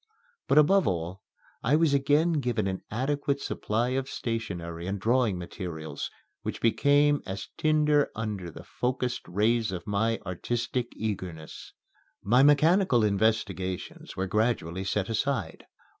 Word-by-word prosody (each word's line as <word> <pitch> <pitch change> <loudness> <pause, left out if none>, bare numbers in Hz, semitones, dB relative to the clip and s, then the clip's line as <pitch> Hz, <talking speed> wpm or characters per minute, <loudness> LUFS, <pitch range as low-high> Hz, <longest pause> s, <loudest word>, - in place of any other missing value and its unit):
But, - - +3
above 190 +6 +5
all, 90 +1 -2 0.4
I 135 +6 +3
was 160 -2 +3
again 145 +4 +3
given 120 -6 -1
an 95 -1 -2
adequate 140 +4 -1
supply 115 -2 -1
of 130 +1 -2
stationery 90 -7 -4
and 100 +1 -2
drawing 115 -2 +2
materials, 85 -3 -6 0.3
which - - -4
became 145 +5 +3
as 95 0 -5
tinder 150 -2 +3
under 105 -5 -4
the 80 - -11
focussed 125 0 -2
rays 110 +4 +1
of 90 -3 -5
my 110 +3 +1
artistic 120 +6 -2
eagerness. 90 -7 -5 0.5
My 120 +6 +4
mechanical 150 - +5
investigations 100 -3 -1
were 95 - 0
gradually 95 -3 0
set 95 0 0
aside. 115 - -2
115 Hz, 130 wpm, -28 LUFS, 95-135 Hz, 0.5 s, above